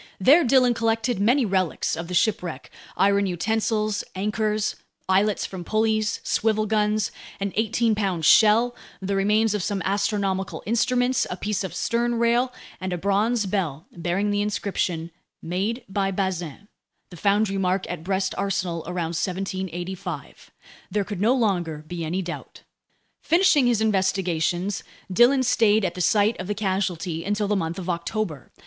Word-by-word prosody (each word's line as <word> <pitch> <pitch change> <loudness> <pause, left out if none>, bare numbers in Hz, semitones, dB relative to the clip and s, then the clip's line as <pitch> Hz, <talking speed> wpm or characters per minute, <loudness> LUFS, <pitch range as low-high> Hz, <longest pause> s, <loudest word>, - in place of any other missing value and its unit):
There 285 - +6
Dillon 255 -1 +4
collected 225 0 0
many 240 +6 +3
relics 185 -4 0
of 165 +1 -5
the 180 - -4
shipwreck: 175 -8 0 0.3
iron 200 0 +3
utensils, 215 +3 0
anchors, 210 +2 -1 0.3
eyelets 195 +2 +2
from 185 -2 -7
pulleys, 215 +2 0
swivel 215 -1 +1
guns, 210 -1 +1 0.3
an 200 -1 -2
eighteen 225 +1 +1
pound 190 -6 -1
shell, 225 +6 +5 0.2
the 195 +1 -2
remains 210 +2 +2
of 210 - -1
some 200 +2 -1
astronomical 195 -1 -1
instruments, 245 +3 +1
a 180 - -4
piece 205 +1 -2
of 190 - -5
sternrail, 235 +1 +1 0.3
and 185 0 -4
a 180 - -1
bronze 205 +5 +1
bell 175 -6 -2
bearing 180 +4 -1
the 205 0 +1
inscription 185 -5 -2 0.3
"Made 200 +8 -2
by 195 0 -1
Bazin," 190 -2 -3 0.4
the - - -9
foundry 200 +2 +1
mark 185 0 0
at 170 -3 -5
Brest 190 +1 -1
Arsenal 180 -4 -1
around 170 -2 -3
1785. 185 0 -4 0.4
There 210 - 0
could 200 -2 -5
no 235 +5 +4
longer 175 - 0
be 175 -1 -5
any 175 +4 -2
doubt. 175 0 -8 0.6
Finishing 335 -6 +4
his 235 -3 +2
investigations, 190 -2 0 0.3
Dillon 255 +6 +5
stayed 220 -4 +3
at 175 - -1
the 180 - -5
site 210 +4 +2
of 185 - -5
the 210 - -2
casualty 185 -4 -2
until 205 +1 -1
the 210 - +1
month 165 -2 -2
of 185 -2 -6
October. 170 - -3
200 Hz, 150 wpm, -24 LUFS, 180-220 Hz, 0.6 s, There